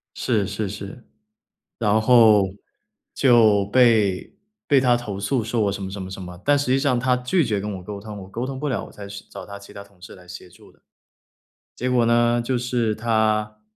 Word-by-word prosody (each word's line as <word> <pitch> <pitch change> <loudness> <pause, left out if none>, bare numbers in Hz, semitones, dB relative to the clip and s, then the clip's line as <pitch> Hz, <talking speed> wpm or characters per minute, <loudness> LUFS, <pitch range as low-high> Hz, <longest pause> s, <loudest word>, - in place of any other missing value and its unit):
是 110 -6 0
是 105 -1 -3
是， 100 +4 -9 0.7
然 110 -1 +2
后 110 -4 +5 0.7
就 110 -6 +4
被 110 -5 +2 0.3
被 140 -3 +4
他 125 -2 +3
投 105 -5 -6
诉 115 +4 -1
说 115 0 -1
我 100 -1 +1
什 100 - -6
么 95 - -5
什 100 0 -7
么 95 - -7
什 95 0 -8
么， 90 -1 -9
但 145 0 +3
实 145 - -1
际 130 +1 +2
上 135 -4 +1
他 125 +1 +2
拒 125 +6 0
绝 105 -3 -1
跟 105 +1 -4
我 90 - -11
沟 100 +1 -7
通， 105 0 -9
我 95 - -10
沟 115 +6 -5
通 135 0 -6
不 150 - -3
了 130 - -2
我 - - -14
才 100 -1 -10
去 100 0 -9
找 - - -9
他 100 0 -9
其 100 - -14
他 100 - -9
同 100 -3 -25
事 90 - -11
来 90 -1 -17
协 90 0 -11
助 - - -19
的。 - - -31 1.0
结 125 +1 -2
果 125 -2 +3
呢， 120 0 +3
就 125 +1 -1
是 120 -3 -1
他， 110 -1 0
110 Hz, 235 characters per minute, -22 LUFS, 100-125 Hz, 1.0 s, 后